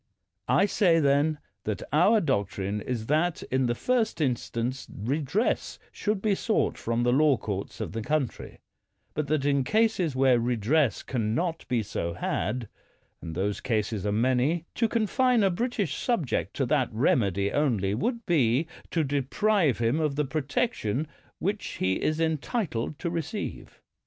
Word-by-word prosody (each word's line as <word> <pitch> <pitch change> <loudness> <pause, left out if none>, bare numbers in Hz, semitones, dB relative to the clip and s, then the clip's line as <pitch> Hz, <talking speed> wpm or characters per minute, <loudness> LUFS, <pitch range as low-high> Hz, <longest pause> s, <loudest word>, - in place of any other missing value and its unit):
I - - +4
say, 180 -4 +3
then, 145 +1 +3 0.3
that 105 -1 -2
our 195 +9 +5
doctrine 100 - -1
is 115 0 -3
that 155 +5 +1
in 130 -1 +2
the 120 - 0
first 245 - 0
instance 125 -2 -2
redress 145 - -1
should 210 -2 -2
be 215 -2 +3
sought 215 +3 0
from 115 +1 -1
the 120 0 +3
law 145 -1 +4
oourts 100 -3 -5
of - - -4
the 115 - -4
country; 150 +1 -2 0.5
but 150 -2 -2
that 150 -1 0
in 140 -2 +2
cases 210 - +1
where 130 -2 +4
redress 120 +4 +1
can 110 -4 -1
not 165 -1 -2
be 120 -3 0
so 85 -4 -3
had 110 +6 -2 0.3
— - - -42
and 80 -1 -6
those 100 +3 -1
cases 110 -4 -1
are 105 - 0
many 130 +9 +1
— - - -47
to 230 - +1
confine 235 +1 +2
a 195 - +3
British 205 - -1
subject 180 - -1
to - - 0
that - - +1
remedy 100 -4 +1
only 115 -10 +1
would 235 - -2
be 140 -4 +2 0.2
to 165 - +1
deprive 145 - +1
him 120 +6 +1
of 150 -3 0
the 150 0 +1
protection 145 - -1 0.3
which 200 +2 -2
he 95 0 0
is 155 +1 0
entitled 160 - -1
to 170 - -3
receive. 170 +5 -5
140 Hz, 160 wpm, -27 LUFS, 115-175 Hz, 0.5 s, our